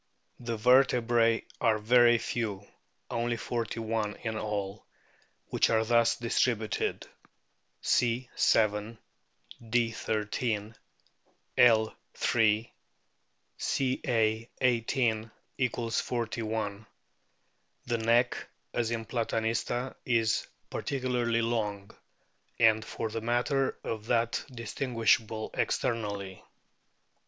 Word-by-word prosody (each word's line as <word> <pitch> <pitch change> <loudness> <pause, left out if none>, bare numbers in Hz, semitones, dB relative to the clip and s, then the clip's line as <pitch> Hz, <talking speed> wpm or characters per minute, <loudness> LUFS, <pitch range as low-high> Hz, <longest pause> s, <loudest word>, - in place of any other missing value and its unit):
The 115 -2 -3
vertebrae 120 -1 +4 0.2
are 110 -1 +3
very 120 +2 +5
few, 105 -4 -3 0.5
only 120 0 -1
forty 115 -1 -3
one 110 -2 -2
in 110 -2 -2
all, 105 -2 -3 0.7
which - - +2
are 110 -1 +2
thus 115 0 +3
distributed: 115 -2 0 0.8
C. 120 +1 +2
7; 105 +1 +2 0.7
D. 115 0 +2
1 105 -1 -2
3; 110 -2 -2 0.8
L. 110 -3 +5 0.2
3; 110 -1 +2 0.9
Ca. 115 -4 0
18 115 -2 +1 0.4
= 115 -2 -4
41. 110 -3 -2 1.0
The 120 -1 0
neck, 120 +2 +2 0.2
as 120 -2 0
in 115 -1 -3
Platanista, 115 +2 -1
is 115 -3 +1 0.2
particularly 125 -3 0
long, 105 -4 -2 0.7
and 110 -1 +5
for 110 +1 -4
the 115 +1 -4
matter 125 +4 0
of 110 -1 -4
that 115 -1 +1
distinguishable 115 -2 0
ex - - +1
ternally. 100 -4 -3
115 Hz, 90 wpm, -29 LUFS, 110-120 Hz, 1.0 s, very